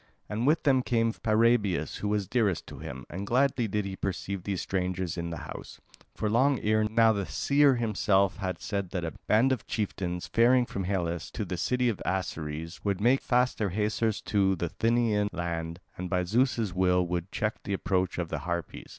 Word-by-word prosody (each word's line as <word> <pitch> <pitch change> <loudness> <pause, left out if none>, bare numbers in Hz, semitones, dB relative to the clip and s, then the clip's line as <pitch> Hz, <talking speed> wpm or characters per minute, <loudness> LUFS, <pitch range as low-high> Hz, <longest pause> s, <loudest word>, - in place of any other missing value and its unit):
And 110 +5 -1
with 155 +3 +3
them 135 -3 +4
came 115 -2 +1
Paraebius, 110 -8 +2
who 105 - -3
was 105 -2 0
dearest 105 -7 +1
to - - -10
him, 65 0 -7
and 100 +3 -6
gladly 125 -1 +2
did 105 0 -1
he 95 -1 -4
perceive 100 0 -3
these 100 -3 -2
strangers 90 -2 -2
in 85 -1 -3
the 85 - -5
house. - - -9 0.4
For 110 - -1
long 130 +5 +3
ere 110 0 +2
now 110 +1 +4
the 100 -2 -2
seer 140 -1 +3
himself 100 -4 +2
had 95 -4 -3
said 100 -4 -3
that 90 -2 -3
a 80 - -3 0.2
band 120 +5 +4
of 130 -5 -2
chieftains, 90 -5 -2
faring 120 +2 +4
from 100 -5 -4
Hellas 85 -4 -2
to 105 - -3
the 90 - -3
city 125 +7 +1
of 115 -5 -1
Aceres, 80 -3 -3
would 100 -2 0
make 125 +6 +3
fast 125 0 +1
their 105 -3 +1
hawsers 105 +2 0
to 95 -2 +2
the 85 -1 -2
Thynian 115 -2 +1
land, 85 -1 -4 0.2
and 90 0 -4
by 90 -1 +1
Zeus' 115 0 +1
will 90 -1 +3
would 90 +1 -3
check 105 +1 -2
the 100 - -4
approach 95 -1 0
of 85 -2 -2
the - - -3
Harpies. 85 -1 -4
100 Hz, 195 wpm, -28 LUFS, 90-115 Hz, 0.4 s, them